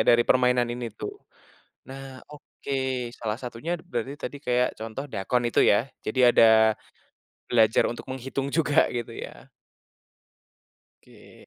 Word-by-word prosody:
dari 120 Hz, 0 st, +4 dB
permainan 125 Hz, -1 st, +3 dB
ini 120 Hz, -1 st, -5 dB
tuh. 105 Hz, -, -7 dB, 0.7 s
Nah 135 Hz, 0 st, -9 dB
oke 145 Hz, -1 st, -9 dB, 0.4 s
salah 110 Hz, -2 st, -4 dB
satunya 130 Hz, +8 st, -4 dB
d 165 Hz, -, -17 dB
berarti 120 Hz, +3 st, -4 dB
tadi 145 Hz, -, -6 dB
kayak 125 Hz, -2 st, +1 dB
contoh 115 Hz, +5 st, -5 dB
dakon 120 Hz, 0 st, -1 dB
itu 120 Hz, -, +2 dB
ya? 105 Hz, +4 st, +4 dB, 0.2 s
Jadi 110 Hz, +4 st, -3 dB
ada, 110 Hz, -2 st, +6 dB, 0.8 s
belajar 110 Hz, -2 st, +4 dB
untuk 120 Hz, -, -6 dB
menghitung 135 Hz, +1 st, -4 dB
juga 155 Hz, -2 st, +3 dB
gitu 120 Hz, -2 st, -4 dB
ya. -, -, -9 dB, 1.6 s
Oke. -, -, -18 dB
125 Hz, 130 wpm, -26 LUFS, 115-135 Hz, 1.6 s, ada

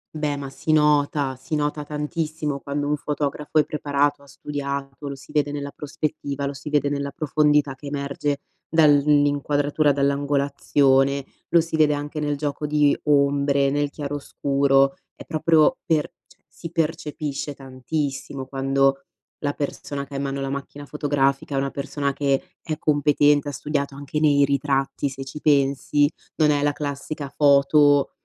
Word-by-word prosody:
Beh, 150 Hz, -2 st, -1 dB
ma 140 Hz, -, -5 dB
si 155 Hz, -, -2 dB
nota, 145 Hz, -2 st, +2 dB
si 155 Hz, +5 st, -5 dB
nota 150 Hz, 0 st, -1 dB
tantissimo 150 Hz, -1 st, -3 dB
quando 145 Hz, +1 st, -3 dB
un 150 Hz, -, +1 dB
fotografo 150 Hz, +1 st, -3 dB
è 150 Hz, -, +5 dB
preparato, 145 Hz, -1 st, 0 dB
ha 140 Hz, -, -18 dB
studiato, 140 Hz, 0 st, -5 dB
lo 140 Hz, -, -4 dB
si 135 Hz, 0 st, -15 dB
vede 145 Hz, -1 st, +1 dB
nella 140 Hz, -1 st, -5 dB
prospettiva, 145 Hz, -1 st, -4 dB
lo 140 Hz, -, -2 dB
si 140 Hz, +2 st, -8 dB
vede 145 Hz, -1 st, +2 dB
nella 140 Hz, 0 st, -2 dB
profondità 150 Hz, -2 st, +2 dB
che 140 Hz, +2 st, -11 dB
emerge 140 Hz, 0 st, -2 dB, 0.3 s
dall'in 145 Hz, -2 st, +5 dB
inquadratura, 145 Hz, +1 st, +1 dB
dall'angolazione, 140 Hz, -1 st, +2 dB, 0.2 s
lo 170 Hz, -, +5 dB
si 165 Hz, 0 st, -4 dB
vede 150 Hz, -1 st, +4 dB
anche 145 Hz, +1 st, -5 dB
nel 145 Hz, -1 st, -1 dB
gioco 145 Hz, 0 st, -3 dB
di 150 Hz, -1 st, +3 dB
ombre, 140 Hz, -1 st, +3 dB
nel 145 Hz, 0 st, 0 dB
chiaroscuro, 140 Hz, -1 st, +1 dB, 0.2 s
è -, -, -11 dB
proprio 160 Hz, +8 st, +3 dB
per 155 Hz, -3 st, +2 dB, 0.2 s
cioè, -, -, -25 dB
si 165 Hz, -, -9 dB
percepisce 150 Hz, -3 st, -3 dB
tantissimo 135 Hz, +1 st, -4 dB
quando 135 Hz, 0 st, +1 dB, 0.3 s
la 145 Hz, -1 st, -1 dB
persona 140 Hz, -1 st, -4 dB
che 140 Hz, -, -14 dB
ha -, -, -3 dB
in 140 Hz, -, -2 dB
mano 140 Hz, 0 st, -3 dB
la 135 Hz, -, -2 dB
macchina 140 Hz, +1 st, -6 dB
fotografica 140 Hz, -1 st, 0 dB
è -, -, 0 dB
una 135 Hz, 0 st, -1 dB
persona 140 Hz, 0 st, -2 dB
che 140 Hz, -1 st, 0 dB
è 155 Hz, -2 st, -4 dB
competente, 145 Hz, -1 st, +3 dB
ha -, -, -4 dB
studiato. 140 Hz, 0 st, -3 dB
Anche 145 Hz, +2 st, -4 dB
nei 145 Hz, -2 st, +4 dB
ritratti, 140 Hz, 0 st, 0 dB
se 135 Hz, 0 st, -7 dB
ci 150 Hz, +3 st, -8 dB
pensi, 140 Hz, 0 st, +3 dB, 0.3 s
non 150 Hz, -2 st, +3 dB
è 145 Hz, -, +1 dB
la 145 Hz, -, +3 dB
classica 145 Hz, 0 st, -5 dB
foto, 145 Hz, 0 st, +4 dB
145 Hz, 160 wpm, -23 LUFS, 140-150 Hz, 0.3 s, è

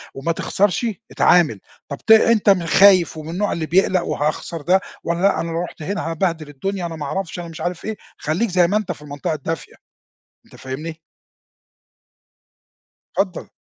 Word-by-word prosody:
وما 145 Hz, +5 st, -1 dB
تخسرش 200 Hz, +6 st, 0 dB, 0.3 s
اتعامل. 155 Hz, -, +4 dB, 0.3 s
طب 140 Hz, -, -4 dB
ت 220 Hz, -, -1 dB
أنت 220 Hz, -1 st, +6 dB
خايف 185 Hz, -1 st, +5 dB
ومن 155 Hz, 0 st, -7 dB
النوع 205 Hz, +4 st, -1 dB
اللي 160 Hz, -2 st, -2 dB
بيقلَق 185 Hz, 0 st, +3 dB
وهاخسر 155 Hz, +2 st, -2 dB
ده 185 Hz, +6 st, +3 dB, 0.2 s
والّا 170 Hz, +1 st, -1 dB
لأ، 200 Hz, +1 st, +3 dB
أنا 165 Hz, 0 st, -4 dB
لو 165 Hz, -, -1 dB
رُحت 175 Hz, -, -9 dB
هنا 195 Hz, -1 st, -3 dB
هابهدل 165 Hz, -2 st, -1 dB
الدُنيا 180 Hz, +6 st, -3 dB
أنا 165 Hz, -, -7 dB
ما 150 Hz, -, -5 dB
أعرفش 175 Hz, +4 st, -4 dB
أنا 175 Hz, -, -6 dB
مش 165 Hz, 0 st, -9 dB
عارف 175 Hz, 0 st, -3 dB
إيه، 220 Hz, -1 st, -4 dB, 0.2 s
خلَيك 175 Hz, +10 st, -1 dB
زي 180 Hz, -1 st, +4 dB
ما 205 Hz, -, +2 dB
أنت 210 Hz, -4 st, -2 dB
في 150 Hz, -, -8 dB
المنطقة 145 Hz, +1 st, -4 dB
الدافية 160 Hz, +3 st, -5 dB, 0.7 s
أنت -, -, -16 dB
فاهمني؟ 155 Hz, +5 st, -6 dB, 2.2 s
اتفضّل. 190 Hz, -3 st, -1 dB
170 Hz, 165 wpm, -21 LUFS, 155-190 Hz, 2.2 s, أنت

